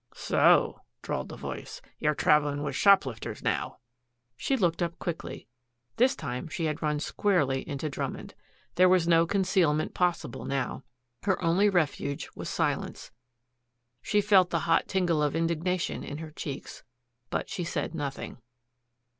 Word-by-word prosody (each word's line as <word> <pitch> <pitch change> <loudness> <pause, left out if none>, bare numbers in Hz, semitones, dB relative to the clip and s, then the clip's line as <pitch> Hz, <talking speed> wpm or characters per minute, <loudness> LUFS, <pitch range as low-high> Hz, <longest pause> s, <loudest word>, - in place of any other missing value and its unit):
"So," - - +3 0.2
drawled - - -3
a - - -7
voice, - - -7 0.2
"you're 150 0 +1
traveling 145 -1 +2
with 150 - -3
shoplifters 140 - +2
now." - - -1 0.6
She 270 - 0
looked 175 -6 +1
up 170 -1 -1
quickly. 170 -8 -5 0.5
This 255 +3 +4
time 125 +1 -5
she 165 +1 -3
had 155 0 -2
run 150 -1 0
squarely 145 -7 +1
into 145 +1 -3
Drummond. 145 - -5 0.4
There 185 +1 +6
was 180 -2 +4
no 165 0 +5
concealment 185 -5 +1
possible 180 -1 -1
now. 135 -1 -2 0.4
Her 190 -2 +1
only 180 +5 +4
refuge 145 -6 -1
was - - -5
silence. - - -2 0.9
She 210 - +2
felt 195 -3 +5
the 170 -2 0
hot 165 0 +3
tingle 175 -5 +1
of 150 0 +1
indignation 165 +2 -1
in 145 - -6
her 160 0 -7
cheeks. 145 -2 -7 0.5
But - - -2
she 195 -3 -4
said 170 - -3
nothing. 140 -5 -5
165 Hz, 145 wpm, -28 LUFS, 150-185 Hz, 0.9 s, There